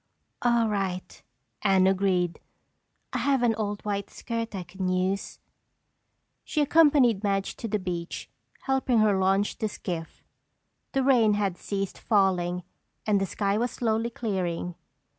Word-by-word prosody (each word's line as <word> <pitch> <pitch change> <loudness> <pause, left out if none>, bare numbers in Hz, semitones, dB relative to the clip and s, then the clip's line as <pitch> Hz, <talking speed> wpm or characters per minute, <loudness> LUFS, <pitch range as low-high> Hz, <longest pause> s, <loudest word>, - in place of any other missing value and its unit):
"All 235 -2 +3
right," 195 -3 -3 0.4
Anne 190 -2 +4
agreed, 190 -2 +1 0.7
"I - - 0
have 270 -3 +2
an 235 -2 +4
old 210 -1 -3
white 200 -1 -2
skirt 230 -3 -4
I 185 - -3
can 190 +1 -4
use." 185 +2 -1 1.1
She 310 - -2
accompanied 285 -8 +5
Madge 195 -1 0
to 230 - -4
the 210 0 0
beach, 175 -3 -4 0.3
helping 265 -2 +1
her 215 -2 +4
launch 195 +2 +1
the 215 - 0
skiff. 170 -4 -6 0.7
The 270 -2 +2
rain 235 -6 +4
had 200 -3 0
ceased 195 +1 -4
falling 180 -4 +1 0.4
and 205 -2 +2
the 195 - 0
sky 200 +2 0
was 240 +1 +1
slowly 225 -1 0
clearing. 185 -7 -2
200 Hz, 140 wpm, -27 LUFS, 190-230 Hz, 1.1 s, accompanied